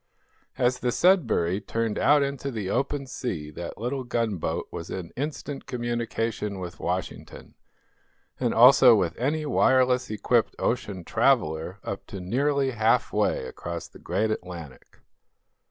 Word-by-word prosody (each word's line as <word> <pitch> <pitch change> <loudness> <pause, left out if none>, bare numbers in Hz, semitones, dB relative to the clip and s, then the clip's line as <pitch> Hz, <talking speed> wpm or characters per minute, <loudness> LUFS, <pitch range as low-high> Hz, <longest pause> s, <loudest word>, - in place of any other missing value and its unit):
As 125 0 +1
the 125 - 0
"Sudbury" 115 - +2
turned 115 0 -2
out 145 -1 +5
into 140 0 -3
the 105 -7 -4
open 140 0 -1
sea 90 - -5
that 85 +3 -7
little 130 +4 -3
gunboat 105 -9 -2
was 85 - -7
in 90 -3 -6
instant 145 +1 -5
communication 115 -3 -2
with 90 -2 -7
Washington, 90 0 -5 0.9
and - - +1
also - - +8
with - - 0
any 150 +5 0
wireless 130 -2 +3
equipped 110 +2 +1
ocean 105 -7 -2
traveler 95 - +1
up 100 - -6
to 100 - -7
nearly 135 +8 0
half 115 -1 +2
way - - +1
across 85 +6 -6
the - - -16
great 105 +5 -1
Atlantic. 85 -9 -8
115 Hz, 135 wpm, -26 LUFS, 90-130 Hz, 0.9 s, also